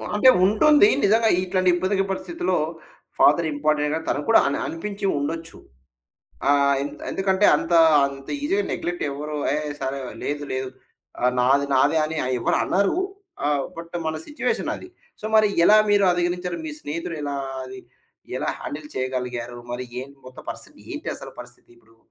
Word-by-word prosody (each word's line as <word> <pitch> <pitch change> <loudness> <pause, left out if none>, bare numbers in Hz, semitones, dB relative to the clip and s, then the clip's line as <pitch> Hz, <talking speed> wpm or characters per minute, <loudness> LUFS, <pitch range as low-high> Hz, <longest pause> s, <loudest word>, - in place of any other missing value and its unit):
అంటే 235 +5 +6 0.2
ఉంటుంది. 215 +4 +5 0.2
నిజంగా 225 +2 +4
ఇట్లాంటి 185 0 +1
ఇబ్బందికర 190 +2 0
పరిస్థితిలో 345 - -2 0.6
ఫాదర్ 170 -1 +5
ఇంపార్టెంట్‌ 150 0 +1
కదా 160 - -2
తను 145 - 0
కూడా 225 - +6
అని - - 0
అనిపించి 200 +4 -5
ఉండొచ్చు. 165 +3 -4 0.9
ఆహ్, 140 0 +4
ఎంత 145 - -7
ఎందుకంటే 195 +1 +2
అంత, - - -4 0.3
అంత 135 -1 -9
ఈజీగా 390 +8 +1
నెగ్లెక్ట్ 175 0 -3
ఎవరు, 150 +2 -5 0.2
ఏహ్! 150 0 -2
సరే 135 +1 -3 0.2
లేదు, 145 0 -2
లేదు. 130 0 -2 0.5
ఆహ్, 125 +1 +2
నాది, 135 +3 +3
నాది 145 +4 +3
అని 160 +1 -4 0.2
ఎవరు - - +1
అనరు. 200 - +1 0.5
ఆహ్, 145 -2 +1
బట్ 170 +1 -7
మన 155 - -1
సిట్యుయేషనది. 300 +4 -2 0.3
సో, - - -13
మరి 215 -1 +5 0.2
ఎలా 215 - +7
మీరు 205 -1 +4
అధిగణించారు? 175 0 -1
మీ 310 - -5
స్నేహితుడు 165 +2 -5
ఎలా 145 -1 -3 0.3
అది? 130 0 -9 0.6
ఎలా - - -1
హ్యాండిల్ 150 +1 -6
చేయగలిగారు? 125 -2 -3
మరి 125 +1 -4 0.2
ఏంటి 140 +1 -13
మొత్తం 130 - -12
పరిస్థితి - - -8 0.2
ఏంటసలు - - -6
పరిస్థితిప్పుడు? 120 -2 -13
155 Hz, 145 wpm, -23 LUFS, 140-195 Hz, 0.9 s, ఎలా